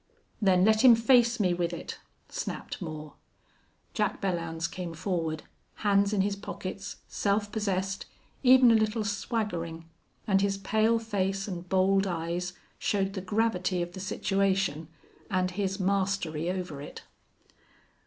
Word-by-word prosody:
"Then 190 -2 +4
let 220 0 +4
him 245 -3 +9
face 235 0 +4
me 185 -4 +3
with 175 -1 -1
it," - - -6 0.3
snapped - - -5
Moore. 155 -3 -6 0.8
Jack 210 -2 0
Belllounds 170 -3 -2
came 170 -1 -6
forward, 165 -3 -2 0.4
hands 200 0 +4
in 205 -2 +2
his 200 +1 0
pockets, 195 0 -6
self 205 0 0
possessed, 195 -3 -2 0.3
even 255 -2 +7
a - - +6
little 220 0 +2
swaggering, 175 -6 -3 0.4
and 195 -2 +3
his 195 0 +1
pale 220 +4 +2
face 195 -3 -1
and 180 -2 -6
bold 195 +1 +3
eyes 175 +1 -2 0.3
showed 195 -1 0
the 190 - -4
gravity 190 -3 0
of 175 0 -8
the 190 - -7
situation 190 -4 0 0.4
and 185 -2 +1
his 195 +1 -2
mastery 190 -4 0
over 180 -6 -4
it. 145 - -9
195 Hz, 135 wpm, -29 LUFS, 180-205 Hz, 0.8 s, him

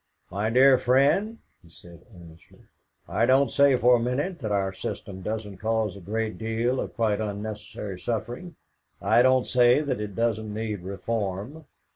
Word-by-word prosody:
"My 100 +3 -1
dear 130 +2 +6
friend," 145 - +2 0.2
he 85 - -20
said 85 +1 -15
earnestly, 85 -4 -16 0.4
"I - - +1
don't 135 +2 +4
say 140 -1 +4
for 125 0 +5
a - - -2
minute 140 +10 -2
that 110 -5 -4
our 95 -1 0
system 95 0 -6
doesn't 105 -1 -5
cause 110 -2 -1
a - - -10
great 110 +4 -3
deal 115 +3 -1
of - - -5
quite 110 -2 0
unnecessary 105 -2 -6
suffering; 120 - -4 0.4
I - - +4
don't 130 0 +4
say 125 +1 +4
that 130 -7 -2
it 105 -2 -6
doesn't 110 -1 -1
need 105 -1 -3
reform. 100 - -4
110 Hz, 160 wpm, -26 LUFS, 100-125 Hz, 0.4 s, dear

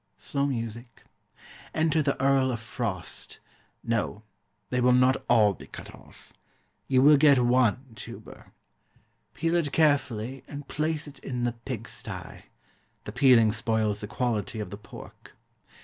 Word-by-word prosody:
Slow 140 0 -1
music. 115 -2 -5 0.7
Enter 160 0 +2
the 140 -2 -1
Earl 135 -1 +3
of 120 - -3
Frost. 110 -6 -5 0.4
No; 115 -2 -2 0.5
they 125 0 +1
will 125 0 +5
not 130 +1 +3
all 110 -4 +5
be - - -13
cut - - -10
off. - - -17 0.5
You 130 -1 +3
will 150 +1 +8
get 140 -1 +6
one 125 0 +2
tuber. - - -11 0.8
Peel 165 +1 0
it 160 -5 +1
carefully, 135 -5 +1
and 145 -1 -8
place 155 0 -2
it 140 -2 -11
in 125 -2 -4
the 120 -1 0
pig 120 -1 -7
stye - - -6 0.6
the - - -7
peeling 120 -2 +5
spoils 110 -2 0
the 105 - -5
quality 110 -2 -2
of 100 -3 -5
the 100 - -6
pork. - - -13
125 Hz, 145 wpm, -27 LUFS, 115-140 Hz, 0.8 s, will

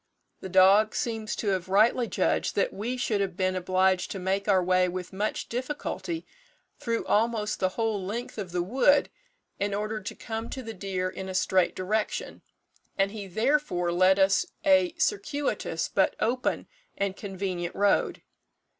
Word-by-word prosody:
The 190 - -7
dog 195 +4 +5
seems 225 -5 -2
to 210 - -2
have 185 -2 -1
rightly 225 +5 +4
judged - - 0
that - - +1
we 240 +5 -3
should 215 -4 0
have 185 -3 -2
been 185 -1 +1
obliged 185 0 +1
to - - -4
make 195 +2 -1
our 190 -3 +4
way 185 0 +3
with 185 +1 -6
much 210 +3 -2
difficulty 295 +6 -4 0.5
through 230 -1 -2
almost 215 0 +1
the 185 - +2
whole 220 -4 0
length 220 +4 -5
of 190 -4 -5
the 175 0 0
wood, 265 +8 +3 0.5
in 200 0 -1
order 215 +1 -3
to 190 - -6
come 225 0 -5
to 260 - -6
the 225 -1 -6
deer 185 -2 -3
in 190 +1 -6
a 185 - -5
straight 185 -1 +2
direction, 210 +4 -2 0.6
and 195 0 +2
he 205 -2 -7
therefore 220 -4 +1
led 185 +2 +4
us 195 0 +3 0.2
a 295 +4 +4
circuitous 300 -6 -1
but - - +1
open 250 +3 0 0.3
and 200 -1 -1
convenient 190 -3 -4
road. 200 0 +1
200 Hz, 165 wpm, -27 LUFS, 185-230 Hz, 0.6 s, dog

